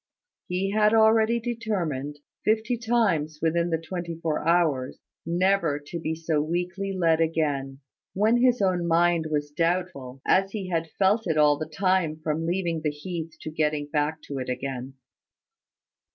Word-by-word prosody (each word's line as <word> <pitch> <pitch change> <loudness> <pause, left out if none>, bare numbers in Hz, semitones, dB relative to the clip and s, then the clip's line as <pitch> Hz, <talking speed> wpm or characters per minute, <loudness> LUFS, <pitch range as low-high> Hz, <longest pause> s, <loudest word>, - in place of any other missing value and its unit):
He 190 +1 -1
had 215 +1 +3
already 220 +1 +4
determined, 190 - -3 0.3
fifty 220 +3 +1
times 215 -11 0
within 170 +2 +1
the 165 - +1
twenty 170 +1 -5
four 160 -2 -2
hours, 160 -7 +2 0.3
never 175 -3 +2
to 145 +4 -7
be 160 0 -2
so 160 -2 0
weakly 180 +5 -2
led 165 -4 +2
again, 145 -4 -1 0.3
when 215 +5 +3
his 245 -3 +3
own 180 -3 +1
mind 170 -1 +3
was 145 -1 -2
doubtful, 165 -5 -2
as 195 +1 +2
he 195 -4 -4
had 165 -2 -1
felt 200 +2 +2
it 160 -2 0
all 150 -1 +5
the 155 0 -4
time 185 -3 +1
from 160 +1 -1
leaving 170 -2 -1
the 155 - 0
heath 160 +2 -6
to 155 - -6
getting 150 -1 0
back 150 +1 0
to 140 -2 -5
it 130 - -4
again. 130 0 -4
165 Hz, 155 wpm, -26 LUFS, 155-195 Hz, 0.3 s, all